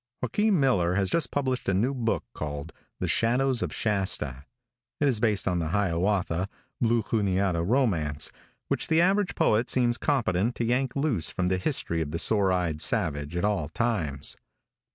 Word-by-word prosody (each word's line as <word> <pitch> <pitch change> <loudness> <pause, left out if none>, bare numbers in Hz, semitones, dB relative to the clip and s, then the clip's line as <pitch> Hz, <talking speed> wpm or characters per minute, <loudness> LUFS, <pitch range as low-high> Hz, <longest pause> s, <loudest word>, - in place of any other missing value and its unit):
|JOAQUIN 205 - +2
MILLER 95 -11 +2
has 95 -1 +1
just 165 - +2
published 130 -5 -1
a 95 - +2
new 120 +8 +1
book 115 -4 -1
called 75 +1 -5 0.3
"The - - -1
Shadows 125 +2 +2
of - - -2
Shasta." 95 - -1 0.5
It 145 - +2
is 125 -6 +2
based 105 -4 +1
on 90 -2 +1
the 80 - -2
Hiawatha, 95 0 0 0.3
Blue 115 -1 +2
Juniata 95 -5 0
romance, 85 - 0 0.4
which - - -1
the 160 0 +3
average 195 +3 +2
poet 110 +3 +2
seems 120 -2 +2
competent 115 -5 +1
to 120 - -1
yank 125 +2 0
loose 135 - 0
from 90 -1 -1
the 95 0 0
history 90 - -1
of 75 - -3
the 80 - -3
sore 100 +1 +2
eyed 85 -4 -1
savage 75 +1 -1
at 90 - 0
all 95 -8 0
times. 80 - -2
100 Hz, 170 wpm, -27 LUFS, 85-125 Hz, 0.5 s, the